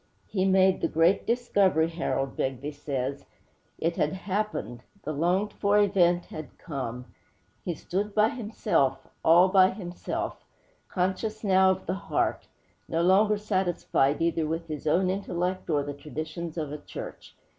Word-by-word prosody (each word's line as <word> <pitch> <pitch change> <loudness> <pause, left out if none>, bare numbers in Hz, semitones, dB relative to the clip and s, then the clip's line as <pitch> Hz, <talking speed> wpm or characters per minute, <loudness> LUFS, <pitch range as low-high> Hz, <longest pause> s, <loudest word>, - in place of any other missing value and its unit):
'He 190 -2 -1
made 190 0 +4
the - - +2
great 165 +4 +2
discovery,' 200 -9 +2
Harold 135 -5 -2
Begbie 135 +2 -2
says. 140 -2 -4 0.5
'It 165 +1 -1
had 150 +1 +1
happened; 190 - -3 0.2
the 155 - -3
longed 180 +7 +1
for 205 0 +2
event 180 -4 +3
had 155 -1 -9
come; 125 -6 -5 0.6
he 175 - -2
stood 200 +6 -3
by 215 +1 +5
himself, 215 - 0 0.2
all 170 +3 +7
by 185 -1 +6
himself, 180 -3 -5 0.5
conscious 190 +4 -2
now 190 -2 +5
of 190 - 0
the 180 - -1
heart; 195 0 -1 0.4
no 165 +1 +1
longer 205 +4 +4
satisfied 180 -8 0
either 165 -2 +1
with 165 +2 -3
his 155 -1 -5
own 185 +4 +3
intellect 185 -1 -2
or 145 -3 +2
the 145 0 -5
traditions 155 +3 -6
of 155 -3 -3
a 150 - -5
church. - - -9
175 Hz, 145 wpm, -27 LUFS, 155-195 Hz, 0.6 s, all